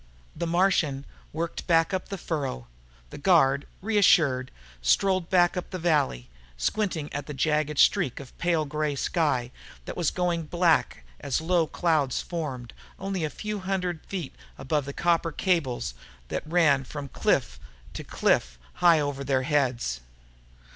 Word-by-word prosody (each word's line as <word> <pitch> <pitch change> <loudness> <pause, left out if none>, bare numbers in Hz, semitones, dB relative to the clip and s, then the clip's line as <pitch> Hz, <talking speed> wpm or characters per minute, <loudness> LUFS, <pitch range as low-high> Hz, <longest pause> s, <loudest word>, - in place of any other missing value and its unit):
The 170 - -3
Martian 165 -6 +1 0.3
worked 165 +2 -4
back 165 +2 +3
up 185 - -2
the 195 - -4
furrow. 140 - -3 0.5
The - - -8
guard, 145 -5 +3 0.2
reassured, 165 -12 +3 0.3
strolled 185 - +2
back 175 -1 +4
up 180 - -4
the 185 - -4
valley, 150 - +1 0.3
squinting 165 - -1
at 145 -1 -4
the 150 - -6
jagged 150 +1 0
streak 125 - +3
of 135 -2 -11
pale 170 -3 +1
grey 150 0 -2
sky 135 -5 0 0.3
that - - -6
was 170 -4 +1
going 175 -3 -1
black 170 - +1
as 135 - -1
low 165 0 +1
clouds 155 -7 +1
formed, 140 -8 -5 0.2
only 195 -2 -3
a 155 - 0
few 210 +5 -5
hundred 185 -3 -2
feet 180 -8 -5 0.2
above 140 +2 -1
the 140 - -5
copper 170 0 +1
cables 150 - 0 0.4
that - - -2
ran 155 -5 +3
from 145 +2 -7
cliff - - 0 0.3
to - - -6
cliff - - +1 0.2
high 170 -3 +6
over 145 -2 -2
their 130 -1 +1
heads. 130 - 0
155 Hz, 145 wpm, -26 LUFS, 140-175 Hz, 0.5 s, high